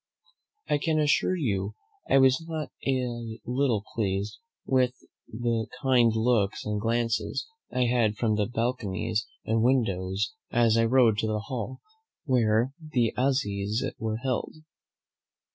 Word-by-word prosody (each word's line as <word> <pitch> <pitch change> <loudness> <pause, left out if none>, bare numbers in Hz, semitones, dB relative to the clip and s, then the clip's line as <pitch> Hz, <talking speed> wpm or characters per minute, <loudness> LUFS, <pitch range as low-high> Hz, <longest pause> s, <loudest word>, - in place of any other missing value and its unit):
I 145 - +2
can 160 +1 0
assure 150 +4 +2
you 105 - -1 0.3
I - - +5
was 130 +3 +4
not 155 -2 -4 0.2
a 120 -4 -2
little 125 -4 +1
pleased 100 -1 -2 0.3
with 130 -1 +2 0.4
the 115 -1 -1 0.2
kind 125 -3 +5
looks 110 -3 +1
and 105 -1 -2
glances 115 +1 0 0.3
I 125 - +1
had 115 -3 +2
from 115 -2 +1
all 105 - +1
the 105 - +2
balconies 115 -3 -1 0.2
and 110 0 +1
windows 100 - +1 0.2
as 115 -1 +3
I 115 0 +4
rode 115 -3 +4
to 110 - 0
the 105 -1 -1
hall 125 0 -5 0.4
where 120 -1 +2
the 130 -8 0
assizes 110 -5 0
were 110 -1 -2
held. 125 +3 -2
115 Hz, 135 wpm, -27 LUFS, 110-130 Hz, 0.4 s, I